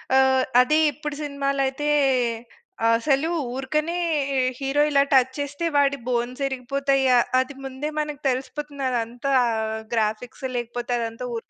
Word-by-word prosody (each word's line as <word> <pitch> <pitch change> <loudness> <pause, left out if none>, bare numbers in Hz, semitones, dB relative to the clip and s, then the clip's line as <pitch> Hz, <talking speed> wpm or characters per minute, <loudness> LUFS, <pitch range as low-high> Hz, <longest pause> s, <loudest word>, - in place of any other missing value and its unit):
ఆహ్, 265 -1 +4 0.2
అదే 305 +5 +3
ఇప్పుడు 295 -1 -6
సినిమాలయితే, 275 0 -1 1.1
అసలు 275 +6 +1 0.2
ఊరకనే 305 +6 -1 0.4
ఈ - - +1 0.2
హీరో 275 +2 +1
ఇలా 280 0 +5
టచ్ 260 0 +4
చేస్తే, 285 +4 -3
వాడి 280 0 +3
బోన్సిరిగిపోతయ్య, 265 +1 +1 0.2
అది 260 +2 -2
ముందే 270 +3 -4
మనకు 300 -1 -4
తెలిసిపోతుంది, 280 +2 -4
అదంతా 245 +3 -2 0.6
గ్రాఫిక్స్ 220 +4 -2
లేకపోతే, 240 +1 -4
అదంతా 230 +2 -4
ఊరికే - - -7
270 Hz, 115 wpm, -24 LUFS, 250-285 Hz, 1.1 s, ఇలా